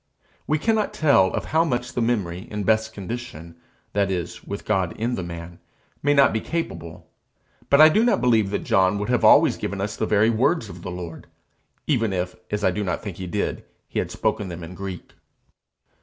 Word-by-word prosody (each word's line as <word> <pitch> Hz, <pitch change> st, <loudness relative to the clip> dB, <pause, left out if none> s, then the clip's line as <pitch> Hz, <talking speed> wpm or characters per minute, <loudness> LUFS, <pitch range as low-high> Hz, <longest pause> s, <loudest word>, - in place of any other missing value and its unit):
We 155 Hz, -, +2 dB
cannot 220 Hz, +5 st, 0 dB
tell 140 Hz, -12 st, +4 dB
of -, -, -3 dB
how 160 Hz, +1 st, +5 dB
much 125 Hz, -5 st, -2 dB
the 120 Hz, -, -1 dB
memory, 95 Hz, -7 st, -1 dB
in 105 Hz, -1 st, -3 dB
best 110 Hz, +2 st, +2 dB
condition 100 Hz, -6 st, -7 dB, 0.4 s
that 100 Hz, -1 st, +1 dB
is, 90 Hz, -4 st, -4 dB
with 100 Hz, -, -6 dB
God 95 Hz, -5 st, 0 dB
in 115 Hz, +3 st, -1 dB
the 95 Hz, -, -2 dB
man 85 Hz, 0 st, -8 dB, 0.4 s
may 145 Hz, +1 st, +2 dB
not 140 Hz, -, +5 dB
be 110 Hz, -, -1 dB
capable; 85 Hz, -, -5 dB, 0.6 s
but 140 Hz, -, +5 dB
I 155 Hz, -, +10 dB
do 210 Hz, +8 st, +3 dB
not 240 Hz, -, +3 dB
believe 115 Hz, -4 st, +3 dB
that 105 Hz, -, -2 dB
John 95 Hz, +1 st, +3 dB
would 105 Hz, +3 st, -3 dB
have 125 Hz, -1 st, +1 dB
always -, -, +6 dB
given 100 Hz, -, -4 dB
us 105 Hz, +2 st, -3 dB
the 110 Hz, -, -2 dB
very 105 Hz, +2 st, +3 dB
words 115 Hz, +1 st, +1 dB
of 85 Hz, -3 st, -10 dB
the 90 Hz, -, -6 dB
Lord, 90 Hz, -2 st, -7 dB, 0.6 s
even 115 Hz, -8 st, +1 dB
if, 90 Hz, 0 st, -2 dB
as 105 Hz, 0 st, -2 dB
I 95 Hz, -, +4 dB
do 105 Hz, +3 st, -2 dB
not 90 Hz, -, -3 dB
think 100 Hz, -5 st, -6 dB
he 95 Hz, -, -5 dB
did, 100 Hz, +3 st, -2 dB, 0.2 s
he -, -, -3 dB
had -, -, -2 dB
spoken 100 Hz, -, -1 dB
them 85 Hz, -1 st, -7 dB
in 85 Hz, +2 st, -8 dB
Greek. 95 Hz, -1 st, -7 dB
105 Hz, 205 wpm, -23 LUFS, 90-120 Hz, 0.6 s, I